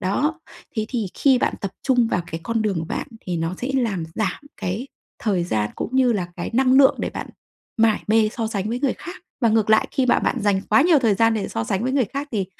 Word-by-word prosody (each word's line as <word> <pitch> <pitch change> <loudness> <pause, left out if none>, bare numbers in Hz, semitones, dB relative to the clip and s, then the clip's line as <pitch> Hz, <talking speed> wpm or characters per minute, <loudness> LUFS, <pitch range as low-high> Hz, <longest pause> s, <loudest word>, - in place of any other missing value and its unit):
Đó, 295 - 0 0.4
thế 220 0 0
thì 230 -5 -2
khi 265 -3 +4
bạn - - 0
tập 195 - -3
trung 245 -3 +3
vào 180 - 0
cái 165 - -4
con 225 +1 0
đường 200 -5 0
của 160 - -3
bạn - - -4
thì 180 -2 -4
nó 165 +2 -2
sẽ 255 - -2
làm 215 -10 0
giảm 200 -4 -1 0.2
cái 205 +6 -4 0.3
thời 190 -6 0
gian 105 -10 -1
cũng - - -3
như 260 -2 +4
là 185 -5 -1
cái 175 - -4
năng 255 +2 +3
lượng 265 0 +6
để - - -2
bạn - - -6 0.5
mải 220 -1 +3
mê 220 0 +4
so 230 - -1
sánh 205 -2 -2
với 240 +2 -2
người 275 -2 +1
khác. 355 - -8 0.3
Và 235 - +4
ngược 220 -1 +2
lại, 220 - +4
khi 265 -3 +1
mà - - +4
bạn - - 0
dành 200 -2 +2
quá 270 - +4
nhiều 330 -1 +5
thời 230 -6 +2
gian 225 +2 +3
để 210 -3 -2
so 115 - -3
sánh 190 - -1
với 255 +2 -1
người 270 -2 +3
khác 280 +7 -5
thì 200 -4 -1
225 Hz, 255 wpm, -22 LUFS, 195-255 Hz, 0.5 s, lượng